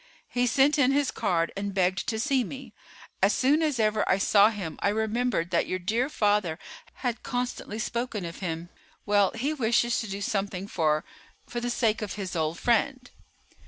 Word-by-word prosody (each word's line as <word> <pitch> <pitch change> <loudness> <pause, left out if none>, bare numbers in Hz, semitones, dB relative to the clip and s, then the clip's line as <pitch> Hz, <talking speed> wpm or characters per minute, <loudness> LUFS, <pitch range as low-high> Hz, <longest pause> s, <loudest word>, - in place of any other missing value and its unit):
He 245 0 +1
sent 275 +5 +3
in 270 -1 +4
his 280 -1 +1
card 165 -2 0
and 200 0 -4
begged 185 0 +1
to 220 -1 -1
see 265 +1 +2
me. 255 0 -8 0.5
As 195 +2 +4
soon 285 +5 +3
as 300 -6 0
ever 215 -1 +2
I 190 - +4
saw 200 +1 +5
him 190 -8 -6
I - - +3
remembered 220 -4 0
that 170 - +1
your 185 - -1
dear 225 +9 0
father 205 - +1 0.5
had 240 -1 -1
constantly 245 -3 -3
spoken 230 -3 -3
of 170 +1 -7
him. 170 -2 -4 0.4
Well, 205 -2 +4
he 270 +7 -1
wishes 240 -3 +2
to 225 - -5
do 195 +1 -4
something 195 -2 -2
for—for 155 +7 -3
the 240 0 -2
sake 225 -3 +1
of 210 -3 -4
his 195 -3 -5
old 160 0 -1
friend." 250 +2 0
215 Hz, 180 wpm, -27 LUFS, 190-245 Hz, 0.5 s, saw